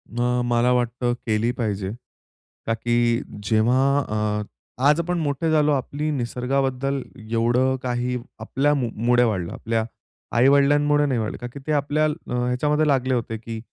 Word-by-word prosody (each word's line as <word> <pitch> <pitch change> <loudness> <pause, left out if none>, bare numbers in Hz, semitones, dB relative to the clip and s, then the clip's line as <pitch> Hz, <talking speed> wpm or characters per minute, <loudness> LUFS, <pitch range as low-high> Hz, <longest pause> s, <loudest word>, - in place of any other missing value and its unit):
अ, 125 +1 +1
मला 120 +1 +2
वाटतं 120 0 0
केली 110 +1 +1
पाहिजे. 105 -6 -3 0.8
ता 115 - +2
की 120 +1 -1 0.5
जेव्हा 110 +5 +3 0.2
अ, 105 -4 -1 0.4
आज 150 +2 +4
आपण 175 +1 -1
मोठे 150 +1 -1
झालो 150 -1 +3
आपली 145 +3 -2
निसर्गाबद्दल 135 +1 -1 0.3
एवढं 120 +3 +2
काही 125 0 -1 0.2
आपल्यामुळे 125 -1 +1
वाढलं, 95 -7 -1
आपल्या 115 -1 -1 0.5
आई-वडिलांमुळे 145 +3 +4
नाही 130 -4 0
वाढलं. 110 -1 -3
ता 120 - -4
की 140 - -8
ते - - 0
आपल्या 145 +1 +1 0.2
ह्याच्यामध्ये 125 +5 +1
लागले 130 -2 +2
होते 115 -2 -2
की 115 0 -7
125 Hz, 135 wpm, -23 LUFS, 115-140 Hz, 0.8 s, आज